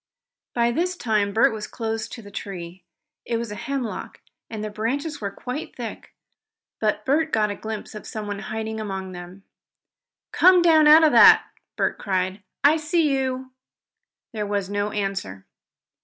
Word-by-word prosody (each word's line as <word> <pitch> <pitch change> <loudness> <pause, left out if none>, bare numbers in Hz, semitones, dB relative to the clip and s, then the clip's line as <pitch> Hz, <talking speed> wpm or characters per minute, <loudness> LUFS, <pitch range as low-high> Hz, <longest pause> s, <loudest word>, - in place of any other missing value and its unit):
By 235 0 +2
this 355 +7 -1
time 210 - 0
Bert 220 +2 +3
was 215 -1 -5
close 225 -1 -3
to 230 - -10
the 205 - -12
tree. 180 -3 -7 0.4
It 235 - -2
was 230 -2 -4
a - - -5
hemlock, 255 +1 -4 0.3
and 220 -2 -5
the 215 - -4
branches 275 +8 -3
were 200 - -2
quite 250 +8 -6
thick, - - -8 0.6
but 210 -1 0
Bert 315 +4 +1
got 215 -2 +2
a - - -4
glimpse 220 0 -6
of 215 - -9
someone 205 -2 -5
hiding 220 +1 -4
among 190 -3 -5
them. 180 +2 -10 0.9
"Come 365 -1 +6
down 315 -3 +6
out 310 +2 +8
of 310 - +5
that!" - - +8 0.3
Bert - - -1
cried. 190 0 -1 0.2
"I 295 +3 +6
see 310 -2 +1
you!" 260 -1 -2 0.8
There 210 -2 -3
was 200 -1 -2
no 205 0 -1
answer. 195 - -4
220 Hz, 160 wpm, -24 LUFS, 200-265 Hz, 0.9 s, out